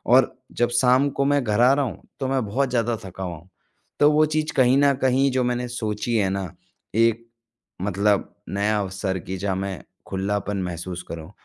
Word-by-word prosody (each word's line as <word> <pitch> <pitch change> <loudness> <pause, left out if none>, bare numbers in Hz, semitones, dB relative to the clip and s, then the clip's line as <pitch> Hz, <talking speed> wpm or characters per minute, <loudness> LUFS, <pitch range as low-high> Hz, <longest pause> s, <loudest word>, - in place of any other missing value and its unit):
और 130 0 +4 0.2
जब 120 0 +1
शाम 125 +3 +3
को 140 - +3
मैं 145 -1 +2
घर 110 +1 +1
आ 125 - +7
रहा 140 0 +1
हूँ 120 - -6 0.2
तो 135 - -1
मैं 130 -3 0
बहुत 130 +6 0
ज़्यादा 120 -2 +1
थका 95 +1 -7
हुआ 90 -2 -4
हूँ। 90 +4 -18 0.5
तो 145 - +6
वो 155 +1 +4
चीज़ 155 +1 -1
कहीं 130 0 +5
न 140 0 +5
कहीं 130 +1 +3
जो 130 -1 +1
मैंने 125 0 -1
सोची 110 -1 -2
है 95 -3 +2
ना 95 0 -2 0.5
एक 115 0 +2 0.6
मतलब 100 +1 0
नया 105 +2 +1
अवसर 95 -1 -2
की, 95 +2 -6
जहाँ 95 0 -1
मैं 95 -6 -4 0.2
खुलापन 100 +1 -2
महसूस 90 0 -5
करूँ। 85 +2 -7
110 Hz, 195 wpm, -23 LUFS, 95-130 Hz, 0.6 s, आ